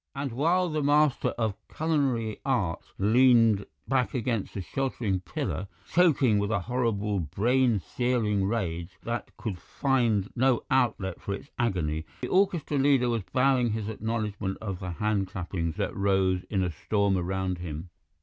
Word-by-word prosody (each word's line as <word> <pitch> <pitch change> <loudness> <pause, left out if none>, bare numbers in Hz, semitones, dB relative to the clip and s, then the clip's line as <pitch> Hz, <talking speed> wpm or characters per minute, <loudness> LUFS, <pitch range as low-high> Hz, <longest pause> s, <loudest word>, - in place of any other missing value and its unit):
And 140 -1 -3
while 170 +9 +2
the 155 -2 -1
master 145 -1 +3
of 110 -3 0
culinary 135 -9 0
art 100 -11 0 0.2
leaned 115 -1 +4 0.2
back 130 0 +1
against 115 -4 -2
the 100 - -2
sheltering 115 -4 -1
pillar, 95 +2 -4 0.2
choking 145 - +4
with 100 0 -1
a 110 -4 0
horrible 105 -3 0
brain 115 - +2
searing 110 -2 0
rage 85 -6 -3
that 120 0 -3
could 100 -6 -4
find 115 -7 0
no 130 -1 +2
outlet 120 -8 +1
for 100 - -3
its 140 - -12
agony, 85 -10 0 0.2
the - - -3
orchestra 180 -7 +2
leader 135 -3 +4
was 115 -2 0
bowing 125 -3 +3
his 110 -1 -3
acknowledgments 105 -3 -3
of 95 -4 -4
the 90 - -5
hand 100 +1 0
clappings 85 -3 -3
that - - -2
rose 95 -2 +1
in 95 -3 +1
a 90 - -1
storm 100 +3 0
around 95 0 -1
him. 85 0 -6
110 Hz, 150 wpm, -28 LUFS, 95-130 Hz, 0.2 s, leaned